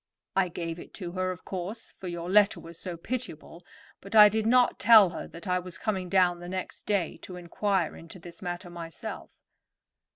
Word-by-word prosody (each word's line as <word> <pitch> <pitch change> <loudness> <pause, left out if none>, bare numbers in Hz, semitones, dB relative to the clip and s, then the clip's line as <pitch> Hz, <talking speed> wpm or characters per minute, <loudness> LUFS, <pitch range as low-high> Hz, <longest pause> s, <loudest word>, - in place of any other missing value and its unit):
I 190 -1 +3
gave 170 -1 -5
it - - -12
to 180 -4 -6
her, 185 +1 -1
of 185 -1 -6
course, 195 +5 -5
for 190 - -10
your 170 -1 -5
letter 205 +2 +4
was 165 0 -10
so 180 -3 -5
pitiable; 180 -5 -6 0.4
but 200 +3 -8
I 210 -1 +10
did 220 +1 -1
not 245 +1 +4
tell 215 -6 +7
her 165 - -6
that 170 +3 -11
I 180 0 +2
was 180 -1 -7
coming 190 -4 -2
down 180 -2 +3
the 175 0 -8
next 185 0 -6
day 200 -5 0
to 180 - -10
inquire 180 0 -1
into 165 +2 -11
this 170 -1 -11
matter 175 0 -5
myself." 165 -1 -8
180 Hz, 195 wpm, -28 LUFS, 175-200 Hz, 0.4 s, I